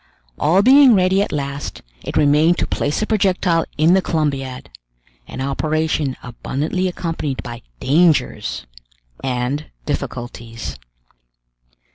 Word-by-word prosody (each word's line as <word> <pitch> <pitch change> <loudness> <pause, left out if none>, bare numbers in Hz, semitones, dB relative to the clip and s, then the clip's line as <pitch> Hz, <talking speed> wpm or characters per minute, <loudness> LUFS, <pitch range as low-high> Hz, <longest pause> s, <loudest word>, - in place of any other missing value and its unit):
All 180 +6 +3
being 265 0 +7
ready 190 +1 +3
at - - -1
last, 140 -1 -4 0.2
it - - -3
remained 150 +4 +4
to - - 0
place 145 - -1
the - - +1
projectile 185 -6 +1
in 160 +3 +4
the 190 - +4
Columbiad, 135 - -2 0.6
an - - -7
operation 155 0 -1
abundantly 145 +9 -2
accompanied 165 -6 -3
by 120 -1 -7 0.2
dangers 160 +3 +1 0.6
and 130 +3 -2 0.2
difficulties. 115 - -5
150 Hz, 110 wpm, -19 LUFS, 135-180 Hz, 0.6 s, being